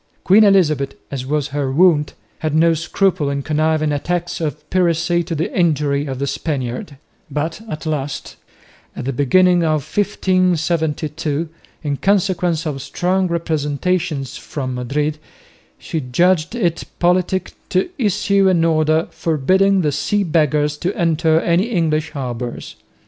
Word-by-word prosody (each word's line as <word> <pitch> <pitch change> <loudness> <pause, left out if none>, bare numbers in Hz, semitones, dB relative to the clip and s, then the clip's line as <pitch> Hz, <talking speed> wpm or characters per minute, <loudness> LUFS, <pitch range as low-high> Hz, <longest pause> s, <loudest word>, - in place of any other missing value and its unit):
Queen 205 +4 +6
Elizabeth, 155 -9 +3 0.2
as 130 -2 -4
was 145 0 -1
her 140 -1 -2
wont, 150 -1 +3 0.2
had 155 -1 -2
no 165 +1 +4
scruple 165 -1 0
in 140 0 -2
conniving 155 0 +1
at 145 +4 -4
acts 175 -1 -1
of 150 -1 -4
piracy 175 -1 +2
to 170 0 -4
the 165 +7 -3
injury 150 -5 +1
of 135 -1 -4
the 140 - -2
Spaniard; 140 -1 -4 0.3
but 160 +6 -3
at 155 -2 -6
last, 145 -3 -3 0.6
at - - -5
the 135 - -1
beginning 175 +7 +4
of 155 -3 0
1572, 165 -5 0 0.3
in 145 -2 -1
consequence 180 -4 +1
of 140 -3 -3
strong 185 +4 0
representations 160 -2 -1
from 130 -3 -5
Madrid, 145 +5 -2 0.6
she 160 - -4
judged 170 - +1
it 175 -8 0
politic 180 +1 +1 0.2
to 185 - 0
issue 200 -3 +2
an 170 -3 +3
order 155 0 +2
forbidding 185 +6 +2
the 150 -3 +1
Sea 200 +8 0
Beggars 150 -3 +1
to 180 - -1
enter 160 -1 +2
any 170 +4 +2
English 160 -8 0
harbours. 125 -4 -5
160 Hz, 140 wpm, -19 LUFS, 145-180 Hz, 0.6 s, Queen